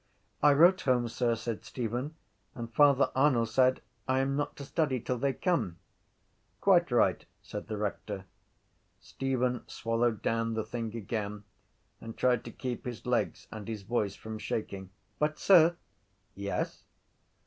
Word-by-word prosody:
—I 145 0 +6
wrote 175 +6 +6
home, 125 -3 +2
sir, 115 0 0
said 115 -1 -4
Stephen, 125 +6 -4 0.4
and 115 -3 -7
Father 140 -2 +5
Arnall 130 -4 +4
said 130 +3 +2 0.2
I 130 0 +2
am 135 +1 0
not 145 0 -2
to 140 - -8
study 145 -3 0
till 125 +1 -3
they 140 +2 +2
come. 150 - -1 0.8
—Quite - - +4
right! - - +3 0.2
said - - -7
the 110 -2 -4
rector. 100 -1 -4 0.7
Stephen 125 -2 -1
swallowed 115 -1 -1
down 115 0 0
the 110 -1 -2
thing 115 0 -4
again 105 -1 -4 0.6
and 115 0 -9
tried 125 -2 +2
to - - -7
keep 125 -2 -5
his 120 -3 -6
legs - - -1
and 110 -1 -7
his 110 -3 -5
voice 105 -2 -1
from 110 0 -7
shaking. 100 -2 -4 0.3
—But, 150 0 +1
sir... 170 -3 +6 0.6
—Yes? 100 0 -3
120 Hz, 150 wpm, -30 LUFS, 110-135 Hz, 0.8 s, I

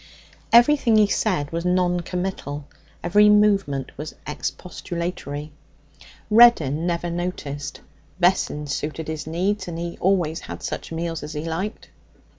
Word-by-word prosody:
Everything 240 -1 +5
he 215 - +6
said 185 -8 0
was 165 0 -2
non 180 0 +2
committal, 175 -5 -4 0.4
every 205 +5 +5
movement 200 -10 +2
was 155 +1 -6
expostulatory. 155 -2 -5 0.8
Reddin 175 - +6
never 170 0 -1
noticed. 160 -5 -4 0.4
Vessons 150 -5 +1
suited 155 +1 -4
his 155 -1 -5
needs, 185 +4 -1
and 170 -1 -5
he 170 0 -5
always 175 -4 +1
had - - -8
such - - -5
meals 165 0 -3
as 150 +1 -7
he 150 +1 -4
liked. 175 +6 -4
170 Hz, 125 wpm, -23 LUFS, 155-190 Hz, 0.8 s, he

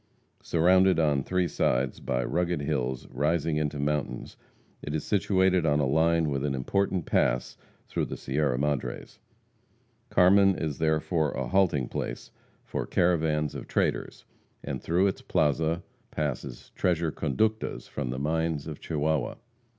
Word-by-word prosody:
Surrounded 90 +1 +4
on 75 -3 +2
three 90 +5 0
sides 65 -3 0
by 60 0 -1
rugged 85 0 0
hills 65 -4 -2
rising 75 +3 0
into 75 -1 -1
mountains, 75 +1 -2 0.5
it 75 - -4
is 80 - -2
situated 95 -3 +2
on 75 -2 +2
a 70 - +2
line 80 +2 +2
with 70 -1 -1
an 70 -2 0
important 95 +6 0
pass 60 -1 +1 0.3
through - - -1
the - - -6
Sierra 70 -1 0
Madres. 70 -3 -3 0.9
Carmen 95 +1 +5
is 75 -3 -3
therefore 80 0 +1
a - - -3
halting 85 -10 +2
place - - -5 0.3
for - - -3
caravans 80 -4 +1
of - - -7
traders, - - -1 0.4
and - - -4
through 90 +4 +2
its 100 - -1
plaza 80 +3 +1 0.3
passes 70 -4 -4
treasure 85 -3 0
conductas 110 +11 -1
from 70 -4 -4
the 65 - -3
mines 80 +1 -1
of 75 -2 -7
Chihuahua. 75 -3 -1
80 Hz, 140 wpm, -28 LUFS, 70-85 Hz, 0.9 s, Carmen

